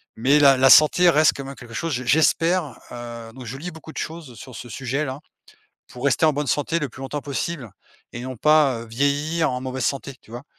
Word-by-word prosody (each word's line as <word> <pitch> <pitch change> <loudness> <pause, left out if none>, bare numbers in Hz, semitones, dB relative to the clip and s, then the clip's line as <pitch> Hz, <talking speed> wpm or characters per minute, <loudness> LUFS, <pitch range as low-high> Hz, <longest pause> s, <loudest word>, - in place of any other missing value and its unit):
Mais 135 +6 +3
la 140 -2 +6
la 135 +1 +5
santé 175 +4 +7
reste 155 -2 +4
quand 140 - -6
même 135 +1 -8
quelque 120 -3 -13
chose 165 +8 -3
j'e 130 -3 -2
j'espère, 160 +1 +2
heu, 120 -1 -8
donc 130 0 -10
je 125 +4 -6
lis 175 +6 -6
beaucoup 160 0 -12
de - - -13
choses 160 -6 -6
sur 125 +3 -11
ce 120 - -9
sujet, 135 +5 -3
là, 135 -1 -5 0.7
pour 125 +2 -10
rester 140 +3 +2
en 155 - +5
bonne 145 +1 -3
santé 145 +5 0
le 150 -4 -3
plus 130 +2 -12
longtemps 145 +2 -4
possible 140 -2 -4 0.4
et 120 - -5
non 130 -1 -7
pas, 150 -4 +4
heu, 115 - -9
vieillir 145 +7 0
en 125 - -3
mauvaise 130 0 -4
santé, 140 0 -2
tu - - -21
vois? 120 +3 -8
140 Hz, 235 wpm, -22 LUFS, 125-155 Hz, 0.7 s, santé